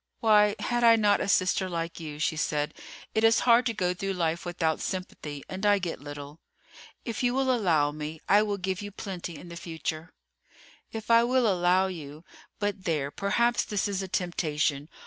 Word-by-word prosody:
"Why 210 Hz, -2 st, +4 dB
had 240 Hz, -1 st, -1 dB
I 230 Hz, -1 st, +8 dB
not 210 Hz, -2 st, +3 dB
a -, -, -1 dB
sister 185 Hz, 0 st, +2 dB
like 170 Hz, -1 st, -4 dB
you?" 150 Hz, -3 st, -7 dB
she 155 Hz, +1 st, 0 dB
said. 150 Hz, -1 st, -1 dB, 0.4 s
"It 220 Hz, -, +1 dB
is 225 Hz, 0 st, +5 dB
hard 245 Hz, +1 st, +5 dB
to 230 Hz, -, 0 dB
go 180 Hz, -3 st, 0 dB
through 195 Hz, +2 st, -3 dB
life 170 Hz, -1 st, -1 dB
without 170 Hz, -2 st, -1 dB
sympathy, 155 Hz, -6 st, -5 dB
and 190 Hz, +2 st, -7 dB
I 205 Hz, -1 st, +5 dB
get 175 Hz, -6 st, -4 dB
little." 145 Hz, +1 st, -9 dB, 0.7 s
"If 230 Hz, -3 st, -3 dB
you 245 Hz, 0 st, +1 dB
will 265 Hz, -1 st, +2 dB
allow 160 Hz, -10 st, +2 dB
me, 155 Hz, +1 st, -6 dB
I 205 Hz, +2 st, +6 dB
will 205 Hz, -1 st, -1 dB
give 190 Hz, +1 st, -3 dB
you 205 Hz, -, -6 dB
plenty 185 Hz, -4 st, -6 dB
in 175 Hz, -, -11 dB
the 170 Hz, -, -8 dB
future." 165 Hz, -1 st, -5 dB, 0.8 s
"If 225 Hz, +1 st, -4 dB
I 230 Hz, 0 st, +7 dB
will 250 Hz, +1 st, +2 dB
allow 185 Hz, -1 st, +3 dB
you! 155 Hz, -4 st, -7 dB, 0.3 s
But 205 Hz, -2 st, -3 dB
there, 150 Hz, -5 st, -1 dB
perhaps 235 Hz, +6 st, +1 dB
this 205 Hz, -1 st, -1 dB
is 200 Hz, -1 st, -2 dB
a 190 Hz, -, -4 dB
temptation. 155 Hz, -5 st, -1 dB
185 Hz, 190 wpm, -28 LUFS, 160-210 Hz, 0.8 s, I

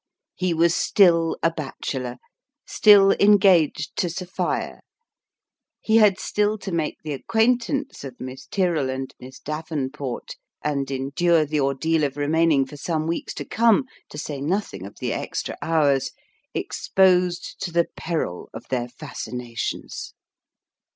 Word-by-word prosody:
He 185 Hz, -1 st, -1 dB
was 170 Hz, +1 st, +3 dB
still 170 Hz, -5 st, +3 dB
a 165 Hz, -, +4 dB
bachelor; 135 Hz, -5 st, -5 dB, 0.5 s
still 200 Hz, -2 st, +6 dB
engaged 190 Hz, -7 st, +4 dB
to 175 Hz, -, +1 dB
Sophia: 180 Hz, +2 st, -3 dB, 1.0 s
he 220 Hz, 0 st, +3 dB
had 210 Hz, -4 st, +5 dB
still 210 Hz, +1 st, 0 dB
to 195 Hz, -1 st, -6 dB
make 165 Hz, -3 st, -1 dB
the 155 Hz, -2 st, -3 dB
acquaintance 240 Hz, -, 0 dB
of 130 Hz, -3 st, -9 dB
Miss 130 Hz, +1 st, -8 dB
Tyrrell 170 Hz, -8 st, 0 dB
and 130 Hz, 0 st, -4 dB
Miss 130 Hz, +1 st, -11 dB
Dav 155 Hz, +2 st, -6 dB
enport, 135 Hz, -3 st, -4 dB, 0.3 s
and 140 Hz, -2 st, -1 dB
endure 145 Hz, +5 st, +1 dB
the 150 Hz, +1 st, -1 dB
ordeal 150 Hz, +4 st, +1 dB
of 140 Hz, -1 st, -1 dB
remaining 150 Hz, -1 st, +3 dB
for 145 Hz, +2 st, -11 dB
some 155 Hz, +1 st, -2 dB
weeks 165 Hz, +1 st, -3 dB
to -, -, -5 dB
come 230 Hz, +3 st, +3 dB, 0.2 s
to -, -, -10 dB
say 145 Hz, -2 st, -5 dB
nothing 145 Hz, -, -2 dB
of 100 Hz, -, -14 dB
the -, -, -2 dB
extra -, -, -4 dB
hours 145 Hz, -5 st, +2 dB, 0.5 s
exposed 180 Hz, -2 st, +1 dB
to 175 Hz, -, -3 dB
the 170 Hz, 0 st, +3 dB
peril 155 Hz, -, -3 dB
of -, -, -9 dB
their 120 Hz, -2 st, -1 dB
fas 145 Hz, +4 st, -8 dB
cinations 120 Hz, -1 st, -5 dB
160 Hz, 140 wpm, -23 LUFS, 135-185 Hz, 1.0 s, still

